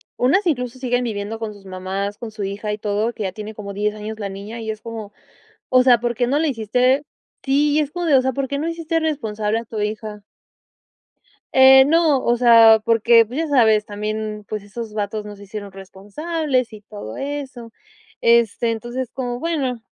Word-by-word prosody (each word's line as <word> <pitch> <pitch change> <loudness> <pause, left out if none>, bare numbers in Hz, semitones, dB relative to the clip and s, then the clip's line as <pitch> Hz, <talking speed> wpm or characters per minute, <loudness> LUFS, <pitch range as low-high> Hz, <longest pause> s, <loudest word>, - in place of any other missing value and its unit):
unas 345 +10 +2
incluso 250 -4 -2
siguen 250 -1 0
viviendo 220 -1 -4
con 220 -2 -5
sus 200 -1 -17
mamás, 190 +2 -4
con 230 -3 -7
su 210 -1 -6
hija 205 +2 -4
y 210 - -3
todo, 210 +2 -1
que 215 - -5
ya 190 -1 -3
tiene 215 +1 -7
como 200 -2 -7
10 210 +1 -1
años 215 +1 -7
la 200 - -3
niña 205 +4 -8
y 220 0 -3
es 215 - -7
como, 225 -3 -7 0.6
o 255 0 +5
sea, 250 -3 +5
¿por 240 0 -2
qué 245 +1 0
no 280 +3 +2
la 320 - +1
hiciste? 250 +2 +1 0.4
Sí, 290 +2 +2
y 310 - +3
es 295 -2 -2
como 350 +1 -3
de, 300 - +3
o 260 - +5
sea, 260 0 0
¿por 275 +2 -2
qué 280 +1 -3
no 315 - -2
hiciste 330 0 -2
responsable 220 -8 -1
a 230 - -6
tu 220 -1 -6
hija? 210 0 -4 1.3
Eh, 265 0 +8
no, 310 -3 +3
o 240 - +3
sea, 230 -2 +7
porque, 230 0 +4
pues, 250 +6 -7
ya 325 0 -1
sabes, 220 -6 +4
también, 215 0 -4
pues, 215 -2 -4
esos 215 +1 -8
vatos 210 +1 -3
no 210 0 -9
se 200 - -13
hicieron 200 0 -8
responsables 250 - -3
y 210 - -10
todo 205 - -9
eso. 270 -5 -6 0.5
Este, 235 0 +3
entonces, 240 +3 -5
como 245 -2 -4
bueno, 275 -6 -2
230 Hz, 205 wpm, -21 LUFS, 210-265 Hz, 1.3 s, Eh